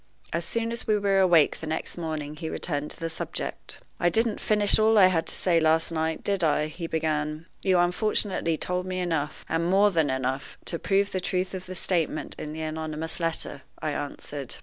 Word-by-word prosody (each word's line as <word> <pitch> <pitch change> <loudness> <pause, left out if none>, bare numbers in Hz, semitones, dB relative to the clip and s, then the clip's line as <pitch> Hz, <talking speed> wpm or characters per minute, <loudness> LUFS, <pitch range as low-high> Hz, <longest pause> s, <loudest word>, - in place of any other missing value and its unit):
As 170 +1 0
soon 230 +6 -2
as 235 - -4
we 215 - +4
were 200 -1 +2
awake 175 -5 +5
the 160 - -6
next 160 +1 -2
morning 155 -3 -4
he 160 0 -5
returned 150 -3 -3
to - - -8
the 165 - -2
subject. 165 - -5 0.2
"I 175 - +4
didn't 225 +4 +1
finish 210 -1 +3
all 220 0 +5
I 195 - +9
had 165 -1 0
to - - +2
say 170 -3 +3
last 160 +1 +3
night, 160 0 -1
did 200 -3 0
I?" 155 -1 +2
he 165 +2 -5
began. 155 -1 -1 0.2
"You 185 -2 +3
unfortunately 180 -2 +1
told 180 +2 -2
me 185 0 -3
enough, 160 -5 -2
and 165 +1 0
more 200 +2 +5
than 160 -5 +2
enough, 130 0 -2
to 170 - -2
prove 200 +1 +1
the 185 - -1
truth 185 +1 -1
of 185 -1 -6
the 185 - -6
statement 170 -4 -1
in 150 - -5
the 160 +1 -5
anonymous 155 +1 -4
letter," 165 -4 -2 0.2
I 155 - -2
answered. 145 -1 -4
165 Hz, 205 wpm, -27 LUFS, 155-185 Hz, 0.2 s, I